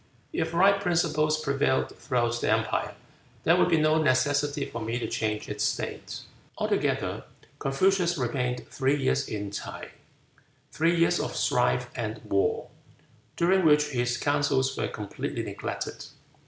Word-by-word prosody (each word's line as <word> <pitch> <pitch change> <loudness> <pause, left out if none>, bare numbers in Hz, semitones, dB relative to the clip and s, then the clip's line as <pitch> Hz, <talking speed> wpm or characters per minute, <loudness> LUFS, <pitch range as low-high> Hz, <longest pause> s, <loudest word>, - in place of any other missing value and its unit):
If 160 - -1
right 195 +3 +5
principles 160 -4 +1
prevailed 140 -2 0
throughout 120 -1 -1
the - - +1
empire, - - 0 0.5
there 165 - +5
would 180 - +3
be 165 - +4
no 155 +1 +3
necessity 145 +1 +1
for 115 - -6
me 115 +2 -2
to 120 - -3
change 105 -1 -2
its - - -3
state." - - -3 0.4
Altogether - - -1 0.4
Confucius 175 +5 +2
remained 125 -1 -2
three 135 +1 +1
years 65 - 0
in 105 -2 -4
Ts'ae, 100 - -6 0.8
three 165 +2 +2
years 170 +1 +3
of - - -3
strife 125 0 +1
and 110 -2 -4
war, 100 0 0 0.7
during 185 +2 +3
which 150 -2 +4
his 120 -3 0
counsels 145 -2 +1
were - - -1
completely 105 -2 -5
neglected. - - -5
145 Hz, 140 wpm, -27 LUFS, 120-160 Hz, 0.8 s, right